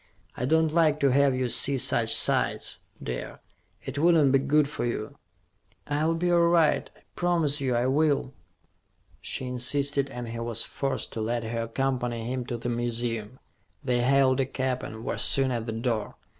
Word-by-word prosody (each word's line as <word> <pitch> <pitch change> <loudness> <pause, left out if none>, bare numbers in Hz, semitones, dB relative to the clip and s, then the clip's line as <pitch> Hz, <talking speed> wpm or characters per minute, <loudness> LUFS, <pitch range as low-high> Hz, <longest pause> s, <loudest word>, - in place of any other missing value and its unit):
"I 125 - -2
don't 160 +2 +2
like 155 -3 +3
to 140 -2 +4
have 140 0 +3
you 130 0 0
see 135 +3 +1
such - - +2
sights, - - +2 0.2
dear. 60 0 -5 0.5
It 135 +2 -4
wouldn't 160 -4 +4
be 135 - +4
good 140 +2 +2
for 150 - -5
you." 120 -3 -4 0.7
"I'll 155 +3 0
be 175 +2 0
all 175 - +4
right. 170 -2 +3
I - - -23
promise 165 -5 +1
you 130 -3 0
I 120 +1 +1
will." 140 0 +1 0.9
She 130 - -4
insisted 140 +2 0
and 120 -3 -6
he 115 0 -5
was 115 -1 +1
forced 135 -1 -4
to 110 - -3
let 115 +2 -1
her 115 +1 -3
accompany 120 -1 -2
him 125 0 -3
to 120 - -3
the 115 - -5
museum. 120 -1 -2 0.5
They 125 -3 +1
hailed 130 +1 +3
a 135 - +1
cab 130 -1 -2
and 110 +1 -8
were - - -2
soon 135 -1 +2
at 120 -1 -3
the - - -2
door. 115 -2 -2
130 Hz, 180 wpm, -27 LUFS, 120-145 Hz, 0.9 s, to